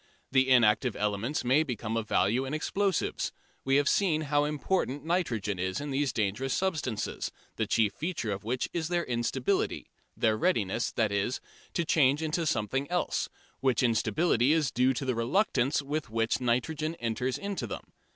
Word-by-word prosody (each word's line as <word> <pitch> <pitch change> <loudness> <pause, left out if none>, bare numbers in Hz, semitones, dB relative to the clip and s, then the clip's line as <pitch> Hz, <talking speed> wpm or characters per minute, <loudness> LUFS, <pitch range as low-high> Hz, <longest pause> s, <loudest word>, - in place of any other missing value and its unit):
The 130 0 +3
inactive 120 -1 +4
elements 105 +7 -1
may 130 +5 +4
become 115 -6 -3
of 115 -1 -2
value 115 +7 +2
in 135 +3 -3
explosives. 195 +5 0 0.3
We 135 0 +2
have 145 0 +3
seen 170 -6 +2
how 145 -1 +1
important 150 -1 -1
nitrogen 115 - -1
is 95 +1 -1
in 145 0 -4
these 135 -1 +1
dangerous 110 +6 -1
substances, 155 - -2 0.2
the - - -1
chief 110 -3 +2
feature 160 - -3
of 100 +1 -4
which 125 +4 -1
is 165 -2 -1
their 175 0 0
instability 120 +1 -1 0.3
their 110 -1 +3
readiness, 115 - +1
that 110 -3 +1
is, 100 +5 0 0.4
to 170 - +1
change 150 -1 +3
into 160 +1 -1
something 135 +4 -1
else 180 0 0 0.3
which 130 -2 +2
instability 125 +3 +2
is 155 -5 +1
due 125 +2 +2
to 135 - -3
the 130 - +1
reluctance 135 - +1
with 145 0 -3
which 115 +2 0
nitrogen 155 +7 0
enters 120 0 -2
into 200 -11 -4
them. - - -7
130 Hz, 165 wpm, -29 LUFS, 115-155 Hz, 0.4 s, inactive